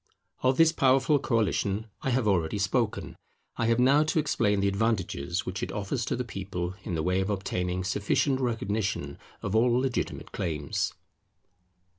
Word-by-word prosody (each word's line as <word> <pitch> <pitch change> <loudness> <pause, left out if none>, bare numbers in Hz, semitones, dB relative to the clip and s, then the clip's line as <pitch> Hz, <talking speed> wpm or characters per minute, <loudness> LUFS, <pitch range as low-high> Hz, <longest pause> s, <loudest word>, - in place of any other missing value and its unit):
Of 130 +1 +2
this 165 -1 +6
powerful 135 +1 +3
coalition 110 -4 0 0.2
I - - -1
have 125 -3 +1
already 90 -1 +1
spoken. 105 +3 -1 0.4
I 115 - 0
have 115 0 +3
now 135 +4 +5
to 160 - -1
explain 110 -9 +2
the 100 - +2
advantages 100 -5 -1
which 95 +1 -4
it - - -3
offers 105 +4 -2
to - - -1
the 125 - -2
people 95 -5 -4
in 90 - -3
the 80 - -1
way 90 +2 +1
of 95 - -2
obtaining 90 -2 -2
sufficient 105 +8 +1
recognition 105 - -2 0.2
of 95 - -2
all 120 +2 +4
legitimate 130 -2 -2
claims. 75 -4 -2
105 Hz, 160 wpm, -28 LUFS, 95-125 Hz, 0.4 s, this